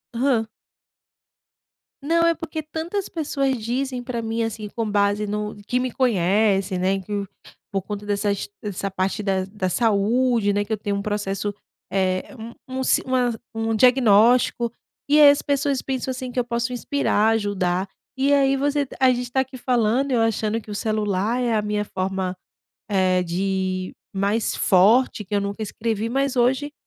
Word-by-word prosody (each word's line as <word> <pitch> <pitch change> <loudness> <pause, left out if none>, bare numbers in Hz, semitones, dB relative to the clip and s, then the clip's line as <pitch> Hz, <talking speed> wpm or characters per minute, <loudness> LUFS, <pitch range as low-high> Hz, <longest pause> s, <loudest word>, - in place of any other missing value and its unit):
hã. 240 -3 +1 1.6
Não, 335 +3 +2
é 335 - +3
porque 320 -1 -5
tantas 330 +6 -4
pessoas 275 -4 -1
dizem 250 +3 -3
para 240 -2 -4
mim, 225 +1 -2
assim, 220 -2 -4
com 225 0 -3
base 205 +1 +1
no 210 0 -3
que 250 0 0
me 255 0 -1
conhecem, 195 -4 +2
né, 190 +1 +1
que, 200 +1 -4 0.5
por 195 -2 -1
conta 205 +1 -6
dessas 205 -1 -1
dessa 200 -1 -3
parte 190 +2 -2
da 190 -2 0
da 195 -2 -3
saúde, 225 +2 +2
né, 205 +1 0
que 210 - -6
eu 220 - +2
tenho 205 -1 -2
um 200 - -2
processo, 205 -1 -2 0.4
eh, 185 +4 -1
um 230 +1 -8 0.3
um - - -1
si - - +3
uma 250 -2 +1 0.2
um 225 0 -1
diagnóstico, 235 0 +4 0.4
e 300 +1 +5
as 285 -1 +7
pessoas 280 -1 0
pensam, 260 -1 -3
assim, 255 0 -6
que 250 - -6
eu 245 - +2
posso 235 +1 -2
inspirar, 245 -4 +1
ajudar. 195 -4 0 0.3
E 275 +2 +3
aí 275 -1 +4
você 285 +1 0
a 260 -1 +6
gente 245 0 -2
tá 265 - +2
aqui 265 0 -4
falando, 245 +2 +1
eu 235 - +3
achando 225 0 0
que 215 - -13
o - - -4
celular 215 +2 0
é 235 -2 +1
a 210 - +1
minha 210 0 -1
forma, 190 -1 -3 0.5
eh, 185 -2 +2
de 185 +1 -2 0.2
mais 200 +3 0
forte 210 +4 +4
que 205 +2 -9
eu 205 - +3
nunca 200 +2 -3
escrevi 220 +1 -2
mas 275 +1 0
hoje, 265 +4 +1
220 Hz, 170 wpm, -23 LUFS, 200-255 Hz, 1.6 s, as